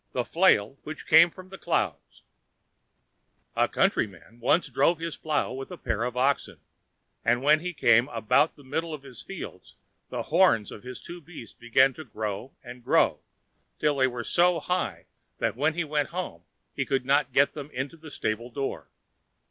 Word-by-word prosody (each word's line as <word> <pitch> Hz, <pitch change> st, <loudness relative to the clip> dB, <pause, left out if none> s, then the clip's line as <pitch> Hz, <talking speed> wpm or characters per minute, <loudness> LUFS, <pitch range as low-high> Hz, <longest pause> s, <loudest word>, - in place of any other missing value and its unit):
The 125 Hz, -1 st, -1 dB
Flail 140 Hz, -, +3 dB
which 155 Hz, 0 st, -8 dB
came 170 Hz, -, +7 dB
from 185 Hz, +2 st, -13 dB
the 190 Hz, -, -10 dB
Clouds -, -, -2 dB, 1.3 s
A -, -, +3 dB
countryman 100 Hz, +4 st, -1 dB
once 145 Hz, +8 st, +2 dB
drove 170 Hz, -, +2 dB
his 165 Hz, 0 st, -4 dB
plow 155 Hz, -2 st, -1 dB
with 135 Hz, +1 st, -6 dB
a 180 Hz, -, -8 dB
pair 115 Hz, -5 st, -2 dB
of 125 Hz, 0 st, -4 dB
oxen, 135 Hz, +2 st, 0 dB, 0.6 s
and 120 Hz, +2 st, +2 dB
when 150 Hz, +2 st, +5 dB
he 180 Hz, +3 st, -4 dB
came 120 Hz, -6 st, +4 dB
about 120 Hz, +4 st, +2 dB
the 145 Hz, -, -17 dB
middle 155 Hz, +4 st, -3 dB
of 140 Hz, -, -13 dB
his 130 Hz, -4 st, -11 dB
fields -, -, -9 dB, 0.3 s
the -, -, -3 dB
horns 105 Hz, -3 st, +3 dB
of 105 Hz, -, -9 dB
his 125 Hz, 0 st, -9 dB
two 175 Hz, 0 st, -9 dB
beasts 150 Hz, -9 st, -11 dB
began 130 Hz, +3 st, +3 dB
to 160 Hz, -, -9 dB
grow, 110 Hz, 0 st, -5 dB
and 120 Hz, -1 st, -10 dB
grow, -, -, +3 dB, 0.6 s
till 150 Hz, -2 st, +1 dB
they 130 Hz, -1 st, +4 dB
were 120 Hz, -2 st, -4 dB
so 175 Hz, +6 st, +3 dB
high 150 Hz, -, -2 dB, 0.3 s
that -, -, -1 dB
when 150 Hz, +5 st, +1 dB
he 175 Hz, -, 0 dB
went 150 Hz, -2 st, -1 dB
home 170 Hz, -, -5 dB, 0.3 s
he 140 Hz, -, 0 dB
could 135 Hz, -1 st, -1 dB
not 140 Hz, +1 st, +2 dB
get 140 Hz, +2 st, +3 dB
them 145 Hz, -1 st, -7 dB
into 130 Hz, +5 st, -4 dB
the 160 Hz, -1 st, -12 dB
stable 115 Hz, -3 st, -3 dB
door. 135 Hz, +2 st, -4 dB
135 Hz, 180 wpm, -27 LUFS, 120-160 Hz, 1.3 s, came